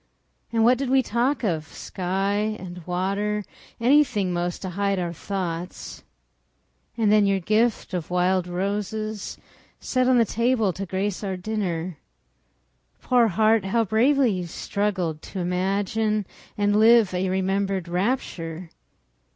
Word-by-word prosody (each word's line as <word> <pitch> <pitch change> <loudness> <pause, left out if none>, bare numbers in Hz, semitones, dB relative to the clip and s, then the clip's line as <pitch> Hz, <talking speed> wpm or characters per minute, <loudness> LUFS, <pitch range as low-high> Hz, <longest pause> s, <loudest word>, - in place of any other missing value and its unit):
And 225 -1 +2
what 245 +2 +4
did 275 -2 -2
we 265 0 +4
talk 245 +5 0
of?—sky 195 +4 -2
and 180 -2 -8
water, 200 +4 -1 0.4
Anything, 240 -7 +3
'most, 175 +1 -2
to 185 - -4
hide 200 +1 0
our 175 -2 -2
thoughts. 180 -1 -5 1.0
And 220 -3 +3
then 210 -1 +5
your 195 -1 +2
gift 215 +3 +1
of 175 -3 -3
wild 180 0 +1
roses, 205 +3 -3 0.4
Set 255 -1 0
on 255 -1 +5
the 230 - +5
table 230 -3 +1
to 195 +2 -5
grace 195 +2 -2
our 190 -2 -2
dinner. 180 -5 -3 1.0
Poor 245 -2 +4
heart, 220 +1 +3
how 230 +4 +2
bravely 250 +5 +3
you 180 -3 -3
struggled 180 -4 -2
To 195 - -7
imagine 200 +4 0 0.3
and 205 0 +2
live 225 -3 +6
a 185 +1 0
remembered 190 -1 -1
rapture! 175 -4 -2
200 Hz, 130 wpm, -24 LUFS, 180-220 Hz, 1.0 s, live